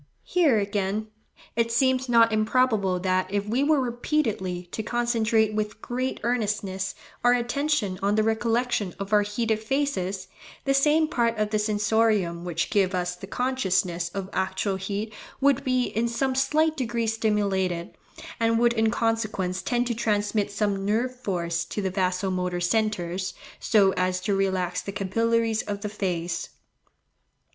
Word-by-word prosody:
Here, 325 -10 +3
again, 205 +1 -1 0.5
it 230 0 +1
seems 260 +1 +2
not 230 -1 +5
improbable 215 -4 +2
that 185 0 0
if 200 0 0
we 235 +6 +1
were 300 0 +3
repeatedly 230 - -1
to - - -3
concentrate 225 -2 +1
with 210 0 -2
great 255 +3 -3
earnestness 205 -5 -1 0.3
our 245 0 +6
attention 245 -5 0
on 200 +1 +2
the 215 - +3
recollection 225 -3 0
of 200 +1 -5
our 210 - +6
heated 215 +1 -1
faces, 220 -6 -1 0.4
the 275 - +3
same 300 +3 +4
part 235 -4 0
of 215 0 0
the 215 - +1
sensorium 210 -4 +1
which 175 -1 -2
gives 195 -3 +2
us 180 0 -1
the 195 +2 -10
consciousness 190 -8 0
of 195 +1 -5
actual 190 +1 -1
heat 205 +3 -4 0.3
would 280 -1 +3
be 255 -2 +2
in 235 0 -1
some 260 +3 0
slight 305 +4 +2
degree 235 -4 -1
stimulated, 200 -6 0 0.4
and 230 0 +2
would 235 0 +4
in 220 -1 +2
consequence 215 -5 -1
tend 240 +6 0
to 240 - -1
transmit 210 -2 0
some 200 -1 -1
nerve 230 +5 0
force 170 -8 -2
to - - -5
the 190 -2 -1
vaso 185 0 0
motor 180 -1 -1
centres, 185 -2 -1 0.2
so 200 -4 +4
as 185 0 0
to 200 +2 -1
relax 190 -2 0
the 200 - -6
capillaries 225 +3 +1
of 205 -1 -5
the 210 - -3
face. 175 -4 -3
215 Hz, 150 wpm, -26 LUFS, 190-235 Hz, 0.5 s, our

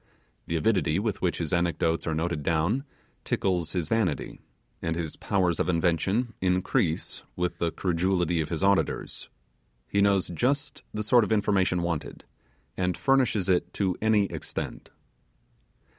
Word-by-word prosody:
The 85 - -2
avidity 90 -4 +2
with 105 0 -2
which 90 - 0
his 85 +1 -3
anecdotes 85 -1 +1
are 80 - 0
noted 85 -1 -1
down 85 - +1 0.4
tickles 90 -4 -1
his 85 -4 -1
vanity, 100 -7 -1 0.4
and 80 0 -1
his 80 -2 -3
powers 90 -4 0
of 90 - +1
invention 90 +7 +1
increase 90 -3 0
with 90 -1 -2
the 85 - +1
credulity 90 -1 +1
auditors. 95 +5 0 0.6
He 100 - +1
knows 100 -2 +3
just 135 - -1
the 105 - -3
sort 120 +2 +5
of 105 - -3
information 100 -4 +2
wanted, 85 -3 -3 0.5
and 90 -1 -1
furnishes 130 -8 +2
it 90 -2 +1
to 95 -3 0
any 110 -1 +4
extent. - - -6
90 Hz, 135 wpm, -27 LUFS, 85-100 Hz, 0.6 s, sort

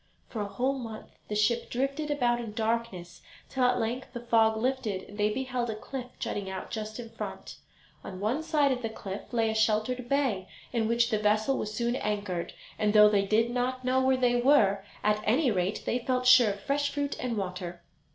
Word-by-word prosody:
For 220 - -4
a 205 - -2
whole 265 +6 -1
month 225 -3 -8 0.2
the 210 - -3
ship 230 +3 +1
drifted 275 +4 -2
about 245 -5 +1
in 225 -3 -6
darkness, 220 -6 -2 0.3
till 260 -1 +1
at 250 0 +3
length 240 +4 -3
the 240 - -4
fog 225 -2 +3
lifted 225 -5 -1
and 205 - -12
they 210 +1 +2
beheld 255 0 -2
a 220 - -2
cliff 250 +3 -6
jutting 200 -2 -3
out 190 0 -6
just 215 0 -5
in 230 -2 -7
front. 225 - -7 0.5
On 185 -1 -7
one 225 +9 0
side 305 -3 +2
of 255 -1 -1
the 225 - -2
cliff 200 -2 -7
lay 225 -2 +1
a - - -2
sheltered 220 +3 +1
bay, 260 -10 +1 0.3
in 225 -2 +1
which 235 +1 +2
the 215 - +2
vessel 215 +5 +2
was 210 - -3
soon 235 +3 -1
anchored, 205 -6 -3 0.3
and 210 -1 +2
though 210 -1 +8
they 200 -1 +2
did 225 +3 +2
not 250 +1 -2
know 260 +1 +3
where 260 0 +3
they 245 -1 +2
were, 210 -8 +4 0.2
at 210 0 +2
any 250 +5 +3
rate 190 0 -1
they 245 - 0
felt 250 +1 -1
sure 250 -3 +7
of 200 0 -4
fresh 285 +1 0
fruit 285 0 -2
and 245 -3 -2
water. 180 -3 -5
230 Hz, 210 wpm, -29 LUFS, 210-255 Hz, 0.5 s, though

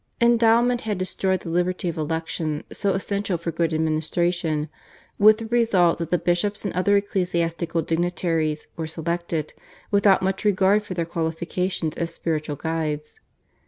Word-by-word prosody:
Endowment 235 +1 +4
had 215 -3 -2
destroyed 185 0 -1
the 170 - -7
liberty 180 +2 0
of 170 - -2
election 160 -1 -2
so 200 -1 0
essential 200 -1 -1
for 170 0 -4
good 165 0 0
administration, 160 0 0 0.5
with 215 +1 +7
the 225 - -6
result 220 -8 +3
that 165 -1 -3
the 175 - +3
bishops 175 +5 0
and 200 - -2
other 195 +3 +2
ecclesiastical 170 -4 -1
dignitaries 165 -2 -1
were 160 -1 -4
selected 165 -1 -3 0.4
without 200 -2 +4
much 190 +2 -1
regard 200 0 +3
for 195 -3 -7
their 170 -1 -1
qualifications 165 0 -2
as 170 0 -2
spiritual 155 -3 -2
guides. 155 -1 -3
175 Hz, 145 wpm, -24 LUFS, 160-195 Hz, 0.5 s, with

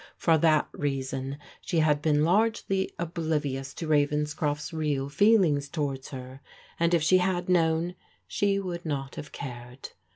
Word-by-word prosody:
For 165 - +3
that 155 -1 +3
reason 135 -1 -3 0.3
she 175 - -2
had 150 -2 +3
been 150 -1 +2
largely 195 +1 +1
oblivious 155 -5 -2
to 165 - -5
Ravens 150 0 +2
croft's 150 +1 -2
real 145 -3 -1
feelings 165 -6 +3
towards 140 -4 -3
her, 130 0 -8 0.4
and 170 +1 +3
if 165 - +1
she 185 +4 +5
had 180 -1 0
known, 170 -1 +2 0.3
she 200 -1 +1
would 180 -3 -4
not 140 -4 -3
have 150 - -8
cared. 125 -1 -8
155 Hz, 150 wpm, -27 LUFS, 140-175 Hz, 0.4 s, she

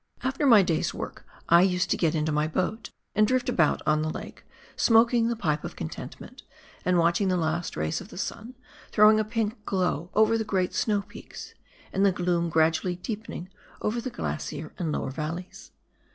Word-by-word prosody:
After 270 +2 0
my 220 -6 +8
day's 165 -3 0
work - - -7 0.2
I 170 +1 +7
used 180 -1 +1
to - - +4
get 165 -2 +1
into 155 0 0
my 150 +1 +1
boat, 185 +7 -2 0.2
and 215 +1 +4
drift 255 +1 +1
about 170 -10 +2
ou 155 0 +3
the 155 - -1
lake, - - -8 0.3
smoking 230 0 +4
the 235 - 0
pipe 155 -8 -1
of - - -6
contentment, 80 - -8 0.4
and 180 0 +2
watch 170 0 +3
the 190 -3 +1
last 165 +1 -2
rays 80 0 -1
of - - -10
the - - -11
sun 235 +5 -5 0.4
throwing 215 0 +6
a - - +2
pink 215 -1 -3
glow 180 -4 -1
over 220 +1 +4
the - - 0
great 190 -4 -1
snow 205 -2 +1
peaks, - - -11 0.4
and 195 - +1
the 200 - +5
gloom 175 -1 0
gradually 160 +3 +2
deepening 205 -2 -6 0.3
over 230 +3 -1
the 255 - -4
glacier 155 - -5
and 165 -4 -1
lower 135 - -2
valleys. 160 +5 -6
180 Hz, 185 wpm, -27 LUFS, 165-215 Hz, 0.4 s, my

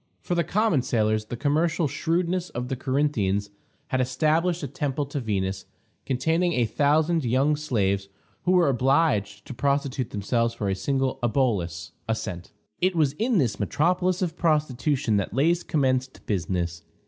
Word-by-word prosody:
For - - -3
the 170 -1 +2
common 210 - +2
sailors, 110 -3 0
the 120 - -6
commercial 155 +4 +1
shrewdness 170 +4 -1
of 125 +1 -5
the 135 - -1
Corinthians 120 -8 0 0.4
had 130 - +1
established 155 +7 +1
a - - -2
temple 140 +1 -2
to 140 +1 -4
Venus, 95 -5 -2 0.4
containing 160 +7 +1
a 120 -4 +2
thousand 150 +7 +2
young 130 +5 +2
slaves, 100 -10 -1 0.4
who 180 - +3
were 180 -3 +5
obliged 130 -6 +1
to - - -7
prostitute 140 -1 -1
themselves 115 +3 0
for 105 -3 -2
a - - +1
single 135 +4 -1
obolus 105 - 0 0.2
(a 110 - +2
cent). 90 -6 -6 0.3
It 185 0 +1
was 150 -4 +2
in 230 0 +2
this 115 - +1
metropolis 180 - +1
of 165 -3 -2
prostitution 145 -7 +1
that 100 +1 -2
Lais 165 +6 +3
commenced 130 -4 -1
business. 85 -4 -2
135 Hz, 155 wpm, -25 LUFS, 110-160 Hz, 0.4 s, were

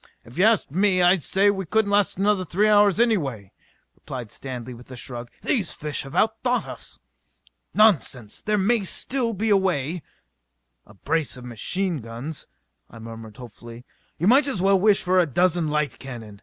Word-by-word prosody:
"If 120 - -14
you 190 - +5
asked 220 -10 +2
me, 190 +3 +2
I'd 175 0 +4
say 200 +1 +3
we 195 -3 -5
couldn't 215 +2 +1
last 205 -3 +2
another 200 -1 +2
three 195 +5 +1
hours 205 -1 +4
anyway," 145 - 0 0.4
replied 120 -5 -8
Stanley 125 -2 -7
with 120 +2 -14
a 130 - -8
shrug. 120 -1 -6
"These 210 - 0
fish 150 -1 -3
have 135 - -9
out 220 +1 +1
thought 250 0 0
us!" - - -8 0.8
"Nonsense! 140 - +2
There 210 0 0
may 210 +2 +2
still 235 +6 -2
be 215 +3 0
a 200 - +6
way 175 -3 -1 0.4
" - - -51
"A 100 - -17
brace 155 +7 -2
of 125 - -10
machine 175 - -2
guns...." 120 +5 -7 0.4
I 115 - -13
murmured 115 -1 -10
hopefully. 120 0 -11 0.3
"You 170 - -2
might 265 +7 +5
as 265 -9 -1
well 195 +1 +3
wish 205 +1 +3
for 185 +1 +3
a 175 - +3
dozen 175 +3 +1
light 150 -1 -1
cannon!" 115 -6 -9
175 Hz, 185 wpm, -24 LUFS, 125-205 Hz, 0.8 s, a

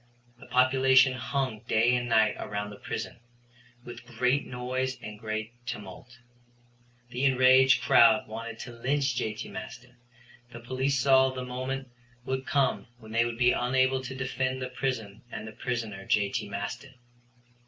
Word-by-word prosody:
The - - -14
population 130 +1 +4
hung 130 -3 -2
day 115 +3 +3
and 120 0 -2
night 110 -2 +4
around 105 0 -4
the 100 - -10
prison, - - -5 0.7
with 120 0 -9
great 125 +3 0
noise 130 +1 -3
and 105 -1 -9
great 110 +1 -4
tumult. 105 +3 -8 0.9
The 125 +3 -2
enraged 130 0 +5
crowd 110 -2 +5
wanted 110 +1 -7
to 125 - -8
lynch 130 +2 -1
J.T. 110 -3 -3
Maston. 125 -1 -9 0.5
The 120 - -9
police 130 +3 -1
saw 130 0 +5
the 130 -1 -5
moment 130 +1 -4 0.4
would 130 0 -3
come 140 -4 +1
when 110 -2 -13
they 115 +1 +2
would 120 -1 -4
be 125 0 +4
unable 130 +1 +1
to 130 0 -7
defend 130 0 -2
the 130 -1 -4
prison 120 -5 -4
and 105 - -6
the - - -7
prisoner 110 -4 -4
J.T. 105 +1 0
Maston. 105 +6 -6
125 Hz, 150 wpm, -28 LUFS, 110-130 Hz, 0.9 s, enraged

